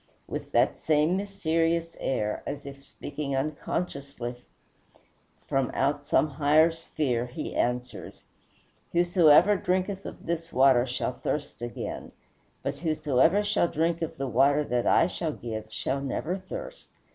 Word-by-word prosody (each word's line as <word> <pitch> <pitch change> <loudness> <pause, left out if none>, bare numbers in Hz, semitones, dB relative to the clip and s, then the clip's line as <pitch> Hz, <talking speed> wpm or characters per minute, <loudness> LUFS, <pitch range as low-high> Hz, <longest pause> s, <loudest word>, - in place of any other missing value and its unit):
With - - -6
that - - +2
same 155 +3 +3
mysterious 165 -4 0
air, 105 -5 -1
as 145 - -5
if 140 0 -9
speaking 140 0 -5
unconsciously 140 -3 -3 1.1
from 135 -2 0
out 145 +1 0
some 155 - +3
higher 150 +3 +4
sphere, 140 -7 -2
he 120 - -6
answers, 125 +1 -3 0.7
"Whosoever 175 +2 +5
drinketh 185 +2 -1
of - - -10
this 165 0 -3
water 130 -1 +5
shall 125 0 -2
thirst 145 -2 -4
again; 120 0 -6 0.5
but 140 0 -3
whosoever 155 +3 +2
shall 205 -4 +2
drink 165 +1 0
of 165 - -4
the 135 - -2
water 135 +5 +3
that 125 -3 -1
I - - +5
shall 165 -3 -3
give 110 -4 -5
shall 135 +5 -2
never 145 +6 -2
thirst. - - -8
150 Hz, 135 wpm, -27 LUFS, 135-170 Hz, 1.1 s, Whosoever